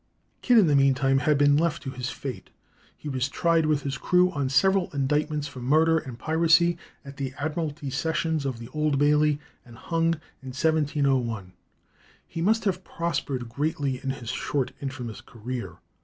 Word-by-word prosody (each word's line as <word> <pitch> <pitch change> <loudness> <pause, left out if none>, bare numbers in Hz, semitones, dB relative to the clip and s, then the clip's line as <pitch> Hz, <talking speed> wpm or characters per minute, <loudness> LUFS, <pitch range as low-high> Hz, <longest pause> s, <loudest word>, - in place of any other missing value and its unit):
Kidd 245 -2 +4
in 210 - +7
the 150 -3 +3
meantime 135 0 +3
had 150 +1 +2
been 145 0 +5
left 170 +1 0
to 135 - -4
his 125 -1 -4
fate. 125 -9 -7 0.5
He - - -9
was 130 -2 -1
tried 165 0 +2
with 150 -2 +1
his 135 -2 -3
crew 180 0 +3
on 140 -6 -2
several 190 +7 +3
indictments 150 +2 0
for 140 -2 -10
murder 160 +6 +3
and 130 -6 -9
piracy 165 +3 +3 0.3
at 140 0 -10
the 135 -1 -4
Admiralty 150 -2 -3
Sessions 160 +2 -1
of 135 -3 -3
the 115 0 -9
Old 150 -2 0
Bailey, 150 +1 +3 0.2
and 120 -1 -15
hung 165 0 0 0.3
in 135 - -11
1701. 135 - 0 0.7
He 165 - -5
must 220 +6 +2
have 185 -2 0
prospered 140 -8 -3
greatly 140 +1 -2
in 135 - -2
his 130 -4 -5
short 130 0 -1
and 135 - -6
infamous 125 -5 -7
career. 115 -6 -7
145 Hz, 170 wpm, -26 LUFS, 130-160 Hz, 0.7 s, in